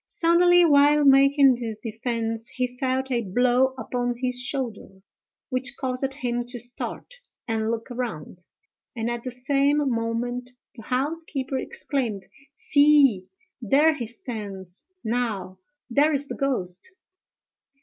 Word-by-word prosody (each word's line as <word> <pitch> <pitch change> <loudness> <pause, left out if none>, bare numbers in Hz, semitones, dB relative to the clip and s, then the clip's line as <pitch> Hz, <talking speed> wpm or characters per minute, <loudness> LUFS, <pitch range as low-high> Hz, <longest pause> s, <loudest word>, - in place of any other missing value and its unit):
Suddenly, 350 +1 +4
while 290 -1 +5
making 275 -1 +6
this 225 -3 -4
defence, 225 +1 -3
he 250 -1 -2
felt 265 0 -1
a 240 -2 +1
blow 250 +5 +2
upon 245 -1 -2
his 250 0 -1
shoulder, 255 -4 -3 0.6
which 255 -1 -1
caused 260 0 -2
him 245 -3 -2
to 245 +1 -7
start 245 - -4 0.3
and 220 -1 -1
look 230 0 -2
round, 180 -8 -6 0.5
and 230 0 -2
at 240 0 -4
the 255 - -5
same 275 +3 +1
moment 245 -2 -2 0.3
the 230 - -10
housekeeper 270 0 -2
exclaimed: 230 -9 -3 0.3
"See! 285 -9 +4 0.3
there 285 +8 +4
he 240 -5 -4
stands, 200 -6 -8 0.2
now—there 235 +6 -1
is 285 -1 -1
the - - -5
ghost!" 260 - -2
250 Hz, 120 wpm, -24 LUFS, 230-275 Hz, 0.6 s, making